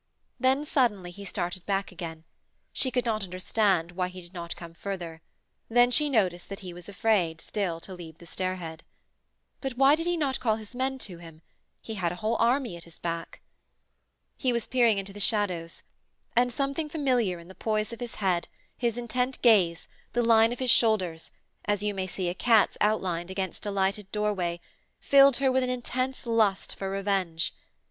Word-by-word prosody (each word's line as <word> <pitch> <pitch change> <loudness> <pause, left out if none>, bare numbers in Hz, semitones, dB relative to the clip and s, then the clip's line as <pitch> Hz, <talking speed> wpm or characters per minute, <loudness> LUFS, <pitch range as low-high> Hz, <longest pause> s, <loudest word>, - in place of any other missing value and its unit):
Then, 265 +3 +3
suddenly, 220 - +1
he 200 +3 -10
started 180 -2 -3
back 195 0 0
again; 165 -3 -7 0.5
she 260 - +2
could 250 -1 0
not 215 -3 0
understand 185 -1 +1
why 180 0 -1
he 185 0 -9
did 175 0 -14
not 170 -2 -5
come 170 -1 -10
further 170 -3 -6 0.5
then 245 +1 +5
she 300 +3 +3
noticed 185 -9 +1
that 195 - -6
he 180 -2 -7
was 175 +2 -9
afraid, 190 -6 +1
still, 180 -5 -2
to 190 - -8
leave 165 -3 -10
the 170 - -14
stairhead. 175 -2 -4 0.8
But 265 -3 -4
why 270 +2 +7
did 330 +2 0
he 350 0 +1
not 280 -4 0
call 220 -3 +2
his 215 +1 -10
men 265 +1 -1
to 180 -4 -9
him? 165 -2 -13 0.4
He 225 - -5
had 180 -5 -1
a - - -4
whole 215 +5 -1
army 240 -3 +2
at 170 - -10
his 170 0 -13
back. 170 -1 -5 1.0
He 255 - +1
was 235 -2 0
peering 235 -4 +3
into 195 0 -4
the 205 - -9
shadows 185 -6 0 0.5
and 245 +1 +4
something 275 +4 -2
familiar 250 - +1
in 170 0 -12
the 190 - -11
poise 215 +2 -1
of 235 - -8
his 240 -2 -6
head, 185 -4 0 0.3
his 235 -2 -1
intent 250 +2 -1
gaze, 185 -8 +4 0.3
the 240 - +2
line 225 0 +5
of 245 - -3
his 255 -2 +2
shoulders, 185 -10 +2 0.4
as 205 -1 0
you 210 0 0
may 190 -1 -2
see 185 -1 -3
a 175 - 0
cat's 220 +3 +4
outlined 185 -5 +1
against 190 +2 -4
a - - 0
lighted 195 0 -1
doorway, 195 -5 -1 0.4
filled 275 -2 +6
her 270 -1 +3
with 260 0 +3
an 255 - 0
intense 255 +1 -2
lust 220 -4 +1
for 195 - -4
revenge. 195 -4 0
205 Hz, 190 wpm, -28 LUFS, 180-245 Hz, 1.0 s, why